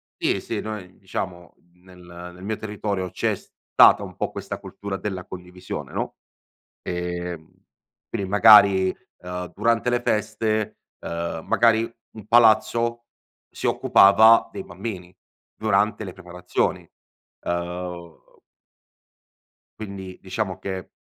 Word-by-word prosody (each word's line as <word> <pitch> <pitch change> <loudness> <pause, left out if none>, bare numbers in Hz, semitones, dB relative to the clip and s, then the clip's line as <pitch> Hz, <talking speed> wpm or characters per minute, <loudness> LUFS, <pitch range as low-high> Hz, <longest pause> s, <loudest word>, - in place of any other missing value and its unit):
sì, - - 0
sì, - - -4
noi 105 -4 -7
diciamo 90 -2 -6 0.2
n 90 - -28
nel 90 -1 -12
nel 90 - -13
mio 110 +2 -2
territorio 100 -3 -3
c'è - - -1
stata - - +3
un - - -9
po' - - -2
questa - - -6
cultura 100 -1 -6
della 95 -2 -5
condivisione, 90 0 -8
no; - - -4 0.7
ehm, 90 -2 -4 0.6
quindi 100 - -3
magari, 100 -3 +7 0.3
uhm, 90 0 -6
durante 115 +1 +1
le 120 0 +1
feste, 110 -1 -1 0.2
ehm, 85 -1 -4
magari 115 -1 +3 0.2
un 110 -2 -12
palazzo 120 +1 +3 0.4
si - - -7
occupava 110 +4 +6
dei 195 - -6
bambini 95 - -7 0.4
durante 110 +1 +1
le 95 -3 -7
preparazioni, 90 -1 -3 0.6
ehm 85 -1 -4 1.6
quindi 95 -3 -8
diciamo 95 0 -3
che 95 -2 -5
95 Hz, 115 wpm, -23 LUFS, 90-110 Hz, 1.6 s, magari